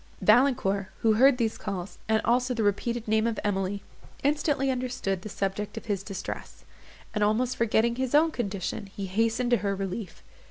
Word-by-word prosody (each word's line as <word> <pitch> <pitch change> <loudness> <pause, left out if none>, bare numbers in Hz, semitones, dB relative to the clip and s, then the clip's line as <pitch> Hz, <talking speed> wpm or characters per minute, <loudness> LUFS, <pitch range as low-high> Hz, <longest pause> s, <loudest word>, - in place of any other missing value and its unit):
Valancourt, 205 -7 +3
who 220 -1 +4
heard 255 +4 +5
these 225 -3 -1
calls, 190 -1 -5
and 220 0 +3
also 250 +1 +2
the 225 - 0
repeated 225 +3 0
name 220 +1 +2
of 230 - -2
Emily, 195 -1 -1 0.4
instantly 285 -1 +1
understood 245 -7 -2
the 215 - -7
subject 200 +1 -3
of - - -6
his 205 -4 -1
distress; 195 -1 -7 0.5
and, 210 -1 +1
almost 240 +5 +1
forgetting 235 +1 +2
his 260 +1 0
own 320 +2 +5
condition, 200 - -3
he 195 0 -6
hastened 225 +5 0
to 240 - +5
her 200 -2 -1
relief. 195 -1 -5
220 Hz, 170 wpm, -27 LUFS, 200-245 Hz, 0.5 s, heard